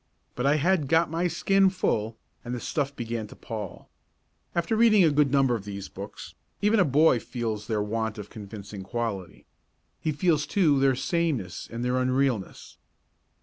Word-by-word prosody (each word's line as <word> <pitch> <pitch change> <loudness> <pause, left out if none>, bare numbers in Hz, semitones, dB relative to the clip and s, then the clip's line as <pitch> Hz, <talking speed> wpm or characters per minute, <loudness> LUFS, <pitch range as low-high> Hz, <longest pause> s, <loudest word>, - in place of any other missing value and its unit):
But 125 +2 -1
I 145 - +4
had 155 0 +2
"got 160 +1 +3
my 170 +2 +1
skin 195 +2 +3
full" 115 - -1 0.3
and 120 +1 -4
the - - -4
stuff 140 +2 -2
began 115 -2 -4
to - - -13
pall. 110 -6 -7 0.7
After 170 +6 +1
reading 220 -3 +6
a 160 - +5
good 145 -2 +3
number 135 -3 +3
of 110 -4 -2
these 100 -1 -7
books, - - -9 0.3
even 210 +2 +3
a 185 - +5
boy 145 -2 +4
feels 110 -4 -4
their 105 -2 0
want 110 +1 -2
of 105 - -6
the - - -19
convincing 100 -1 -8
quality. 100 -4 -4 0.5
He 155 - -1
feels, 150 -1 +1
too, 155 -8 +3
their 135 -1 +3
sameness 135 - -1
and 120 +1 -3
their 125 +1 +1
unrealness. 130 -5 -1
130 Hz, 175 wpm, -27 LUFS, 110-160 Hz, 0.7 s, reading